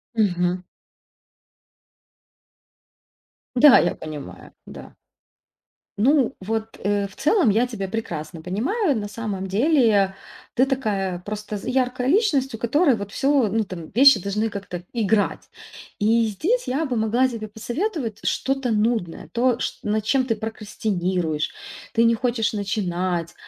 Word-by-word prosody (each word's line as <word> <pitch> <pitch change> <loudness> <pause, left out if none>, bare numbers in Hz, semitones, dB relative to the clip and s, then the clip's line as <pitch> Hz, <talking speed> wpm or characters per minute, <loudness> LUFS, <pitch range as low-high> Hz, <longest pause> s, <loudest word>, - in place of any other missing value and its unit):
Мгм. 180 -4 +1 2.9
Да, 270 +1 +8
я - - +1
понимаю, 145 - -9
да. - - -11 1.0
Ну, 265 +3 +3
вот, 220 +3 -4
э, 205 0 +1
в 195 - -18
целом 305 - +3
я 230 +5 +2
тебя 210 -6 -5
прекрасно 165 -7 -5
понимаю. 275 - 0
На 210 -2 -3
самом 205 -3 -4
деле 215 - +3 0.4
ты 260 - +3
такая 205 -9 -1
просто 210 0 -5
з 195 - -9
яркая 255 -1 0
личность, 285 - +2
у - - -7
которой 270 +5 +3
вот 200 -2 -6
всё, 275 -2 +2
ну, 220 +1 +1
там, 175 -5 -8
вещи 270 -2 +7
должны 210 +4 -1
как-то 200 -3 -6 0.2
играть. 215 -2 0 0.5
И 230 +2 +4
здесь 325 - -1
я 275 +6 0
бы 260 -4 -2
могла 230 +4 +2
тебе 230 -4 -6
посоветовать 240 - -4
что-то 270 -2 0
нудное, 215 -7 -1
то, 245 +2 +1
ш - - -3
над 210 +1 0
чем 265 +4 +2
ты 230 -3 0
прокрастинируешь, 185 -7 -2 0.5
ты 230 - +6
не 230 0 +4
хочешь 235 -2 0
начинать. 185 -4 -2
220 Hz, 135 wpm, -23 LUFS, 195-255 Hz, 2.9 s, Да